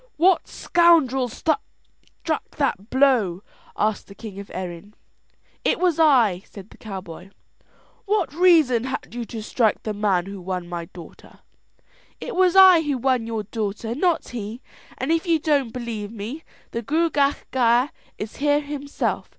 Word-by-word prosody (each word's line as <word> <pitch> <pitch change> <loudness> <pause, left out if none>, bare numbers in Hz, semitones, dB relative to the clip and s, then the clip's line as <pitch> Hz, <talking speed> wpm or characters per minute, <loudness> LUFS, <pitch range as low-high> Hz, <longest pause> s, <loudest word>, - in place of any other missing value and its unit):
"What 360 +3 +3
scoundrel 315 -7 +3
struck 320 - -1 1.0
that 230 -7 -1
blow?" 245 -9 +2 0.3
asked 215 0 0
the 200 - -13
king 200 -2 -9
of 200 - -9
Erin. 185 +3 -7 0.7
"It - - +2
was 355 -3 +1
I," 240 - +4
said 200 0 -12
the - - -16
cowboy. 190 -3 -8 0.8
"What 405 -7 0
reason 315 -9 +4
had 260 - -5
you 240 -1 -4
to 225 -1 -7
strike 225 0 0
the 215 - -3
man 200 -4 +1
who 195 -1 -8
won 180 -1 -4
my 175 -1 -5
daughter?" 170 0 -14 0.8
"It - - -6
was 370 0 +3
I 375 -3 +8
who 290 -4 -1
won 255 -2 0
your 225 -2 -3
daughter, 220 +1 -4
not 335 +5 0
he; 225 -1 -6 0.4
and 260 +5 -2
if 330 +2 0
you 335 -1 +4
don't 290 -5 +1
believe 225 -4 -5
me, 230 +9 -7 0.3
the 230 - -3
Gruagach 290 +1 +1
Gaire 245 +1 +3 0.3
is 210 +1 -7
here 290 +1 +2
himself. 285 -1 -3
245 Hz, 150 wpm, -23 LUFS, 205-295 Hz, 1.0 s, I